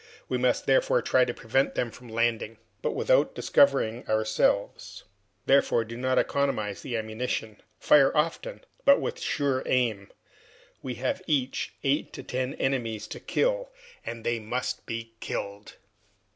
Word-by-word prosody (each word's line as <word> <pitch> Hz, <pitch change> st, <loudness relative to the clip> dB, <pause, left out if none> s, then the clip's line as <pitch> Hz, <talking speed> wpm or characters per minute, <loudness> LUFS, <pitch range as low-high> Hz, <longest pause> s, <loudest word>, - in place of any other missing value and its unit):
We -, -, -1 dB
must -, -, +1 dB
therefore -, -, +3 dB
try 130 Hz, -1 st, +4 dB
to 120 Hz, -, -3 dB
prevent 135 Hz, +4 st, 0 dB
them 120 Hz, -2 st, -1 dB
from 125 Hz, +2 st, -13 dB
landing, 115 Hz, -1 st, -1 dB, 0.2 s
but -, -, -1 dB
without -, -, +2 dB
discovering 135 Hz, -4 st, +3 dB
ourselves. 110 Hz, -2 st, 0 dB, 0.4 s
Therefore, 135 Hz, -4 st, +3 dB
do 115 Hz, +1 st, -8 dB
not 130 Hz, +1 st, 0 dB
economize 110 Hz, -8 st, 0 dB
the 120 Hz, -3 st, -3 dB
ammunition. 110 Hz, -1 st, -4 dB, 0.2 s
Fire 140 Hz, -2 st, +5 dB
often, 335 Hz, -, -1 dB, 0.2 s
but 280 Hz, 0 st, +6 dB
with 475 Hz, 0 st, -3 dB
a -, -, -12 dB
sure 140 Hz, -, 0 dB
aim. 110 Hz, -6 st, 0 dB, 0.7 s
We 130 Hz, -2 st, -5 dB
have 130 Hz, +9 st, -2 dB
each 140 Hz, -5 st, -1 dB
eight 140 Hz, +2 st, 0 dB
or -, -, -7 dB
ten 130 Hz, +2 st, -3 dB
enemies 115 Hz, -5 st, -1 dB
to -, -, -7 dB
kill, -, -, 0 dB, 0.3 s
and 115 Hz, -1 st, -6 dB
they 120 Hz, 0 st, 0 dB
must 115 Hz, +4 st, -4 dB
be 115 Hz, 0 st, -5 dB
killed!" 100 Hz, 0 st, -5 dB
125 Hz, 145 wpm, -27 LUFS, 110-140 Hz, 0.7 s, but